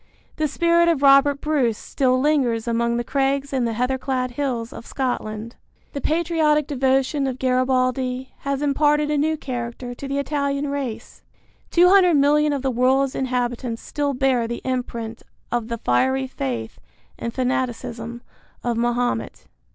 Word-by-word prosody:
The 310 - +1
spirit 340 +3 +3
of 320 -5 +1
Robert 275 0 +5
Bruce 270 -8 +1
still 255 -2 0
lingers 255 -6 +1
among 235 0 +1
the 240 - -1
crags 275 +2 0
and 245 -3 +1
heather 250 +4 -1
clad 255 -1 -2
hills 245 -3 -3
of 230 - -10
Scotland. 230 -4 -3 0.4
The 280 - -4
patriotic 310 -2 +2
devotion 270 0 +1
of 260 -1 -3
Garibaldi 255 0 0
has 280 0 -2
imparted 295 +1 +2
a 300 - +1
new 315 +2 +1
character 245 -2 -5
to 275 +3 -7
the 275 +1 -2
Italian 280 0 -1
race. 275 -6 -5 0.5
Two 350 +1 +5
hundred 365 -3 +6
million 295 +1 +4
of 280 -2 -2
the 265 - +1
world's 260 +2 +2
inhabitants 245 -2 -2
still 285 -2 -2
bear 255 -3 +1
the 235 0 -5
imprint 235 -3 -4 0.3
of 240 -2 -1
the 235 0 -3
fiery 260 - +1
faith 125 - -4 0.4
and 235 - -3
fanaticism 240 -2 -3 0.4
of 240 -1 -1
Mahomet. 240 +1 -1
260 Hz, 150 wpm, -22 LUFS, 240-285 Hz, 0.5 s, hundred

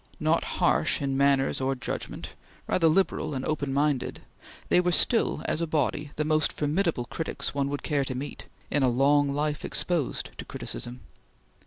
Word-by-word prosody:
Not - - +2
harsh - - +2
in 135 -1 -1
manners 140 -1 +2
or 135 +1 +1
judgment, 130 - -5 0.4
rather 165 -3 +2
liberal 155 -3 +1
and 130 - -3
open 145 -3 -1
minded, 140 -1 0 0.5
they 180 - +5
were 180 0 +1
still 230 +6 +3
as 160 - -1
a 170 - 0
body 150 -1 0
the 150 - -1
most 155 0 +2
formidable 155 -3 0
critics 160 +7 -4
one 140 -1 0
would 145 0 -4
care 145 -3 +1
to 130 - -4
meet, 140 +3 -6 0.3
in 145 - +2
a 130 - +4
long 140 +3 +3
life 150 +1 -1
exposed 170 -7 -1
to - - -4
criticism. 120 +1 -6
145 Hz, 170 wpm, -27 LUFS, 135-155 Hz, 0.5 s, they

